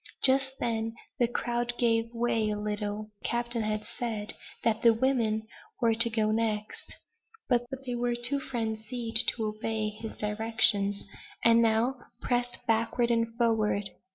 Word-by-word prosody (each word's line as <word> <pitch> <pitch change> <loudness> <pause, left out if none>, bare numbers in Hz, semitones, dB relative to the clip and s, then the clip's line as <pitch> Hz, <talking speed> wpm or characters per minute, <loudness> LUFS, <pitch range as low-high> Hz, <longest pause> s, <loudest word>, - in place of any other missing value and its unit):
Just 265 0 +5
then 225 -1 -1 0.2
the 240 - +4
crowd 240 0 -2
gave 230 -1 +2
way 230 -2 0
a 210 - -1
little. 210 0 -3
The - - -3
captain 235 0 -1
had 215 0 -2
said, 225 -2 -3 0.3
that 225 -1 +1
the 230 -1 +6
women 225 -3 +1 0.3
were 230 -3 +3
to 230 +1 +5
go 215 -2 +1
next; 215 -1 -2 0.5
but 245 -1 +2 0.2
they 250 - -3
were 240 0 0
too 245 +4 +2
frenzied 225 -2 -2
to 225 - 0
obey 215 0 -2
his 215 +1 -8
directions, 210 -1 +1 0.4
and 230 0 +7
now 230 +3 +2 0.2
pressed 245 0 -1
backward 230 +1 +1
and 230 -1 0
forward. 215 -4 +1
230 Hz, 145 wpm, -29 LUFS, 215-240 Hz, 0.5 s, and